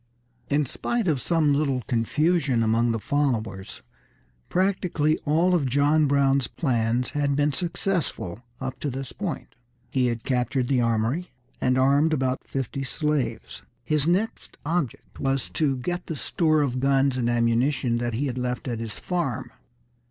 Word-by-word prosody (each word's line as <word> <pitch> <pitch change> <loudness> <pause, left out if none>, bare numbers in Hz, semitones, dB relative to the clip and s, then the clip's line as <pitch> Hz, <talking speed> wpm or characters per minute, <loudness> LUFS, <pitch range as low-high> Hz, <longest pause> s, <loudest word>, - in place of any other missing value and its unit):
In 145 +1 +2
spite 230 - -2
of 145 -6 +1
some 155 -2 +2
little 140 -4 0
confusion 135 +2 +1
among 115 +1 +2
his 115 -2 -3
followers, 115 -9 -1 0.7
practically 180 -5 +1
all 165 +5 +3
of 155 -7 +2
John 145 +4 +3
Brown's 140 -2 +3
plans 120 -3 0
had 145 -1 0
been 145 +1 +2
successful 170 - -2 0.2
up 130 -1 -5
to 145 - -2
this 135 0 -5
point. 195 -6 -5 0.4
He 130 -2 +2
had 120 -1 -2
captured 125 0 0
the 130 -3 +3
armory, 115 +9 0 0.3
and 130 0 +2
armed 140 +4 +4
about 130 -3 0
fifty 135 0 -3
slaves. 150 +1 -2 0.2
His 150 +4 +1
next 195 +6 -1
object 160 -6 -3
was 135 -1 -1
to 140 -4 +1
get 175 +8 -3
the 160 - -3
store 155 0 +2
of 130 -2 -1
guns 135 0 +3
and 120 -2 0
ammunition 120 +1 +1
that 120 -1 -2
he 140 +5 -1
had 130 -2 -2
left 125 +1 -3
at 120 -3 -2
his 110 -3 -5
farm. 170 -10 -2
135 Hz, 150 wpm, -25 LUFS, 125-155 Hz, 0.7 s, armed